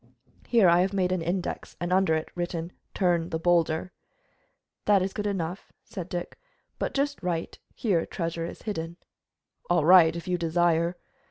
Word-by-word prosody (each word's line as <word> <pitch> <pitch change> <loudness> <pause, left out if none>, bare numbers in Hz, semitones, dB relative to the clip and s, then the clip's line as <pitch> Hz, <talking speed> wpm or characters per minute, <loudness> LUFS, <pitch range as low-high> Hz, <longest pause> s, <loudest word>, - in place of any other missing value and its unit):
Here 230 -6 +5
I 170 +1 +5
have 190 +2 0
made 185 -2 +1
an 185 -2 0
index, 175 +2 -3
and 175 +1 -1
under 190 -4 +3
it 160 - -3
written 175 -1 -4 0.2
Turn 175 -3 +1
the 160 - -1
boulder." 170 +1 +1 0.9
"That 200 -3 +4
is 190 - -3
good 210 -1 -2
enough," 185 -2 -4
said 190 -6 -7
Dick, 175 -1 -5 0.4
"but - - -2
just 285 -2 -1
write 170 -2 -3 0.2
Here 185 -8 0
treasure 165 -1 -3
is - - -10
hidden." 170 -6 -4 0.7
"All 175 -3 +3
right, 170 -2 +7
as 170 +2 -7
you 180 -1 0
desire." 170 +1 +1
175 Hz, 165 wpm, -27 LUFS, 165-190 Hz, 0.9 s, right